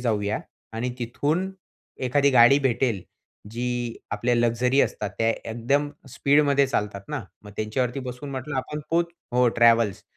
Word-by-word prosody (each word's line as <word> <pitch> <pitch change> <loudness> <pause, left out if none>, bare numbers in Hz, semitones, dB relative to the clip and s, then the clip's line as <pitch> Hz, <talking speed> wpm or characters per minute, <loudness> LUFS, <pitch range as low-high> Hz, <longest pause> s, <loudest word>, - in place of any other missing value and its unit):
जाऊया." 105 -3 0 0.3
आणि 120 +3 -2
तिथून 150 +10 -1 0.6
एखादी 140 +2 +3
गाडी 125 +2 +7
भेटेल 120 -6 0 0.5
जी 120 0 -3
आपल्या 120 0 0
लक्झरी 120 +3 +2
असतात, 105 -2 -1
त्या 115 0 +2 0.2
एकदम 140 +6 0 0.2
स्पीडमध्ये 140 +1 +3
चालतात 105 -6 -2
ना. 150 -3 -3 0.2
"मग 105 - -11
त्यांच्यावरती 120 +4 -1
बसून", 140 +3 -7
म्हटलं, 135 +2 -4
"आपण 150 +3 -3
पोच" 170 +1 +2 0.3
हो, 125 0 +4
ट्रॅव्हल्स. 115 -3 +4
125 Hz, 135 wpm, -25 LUFS, 115-140 Hz, 0.6 s, गाडी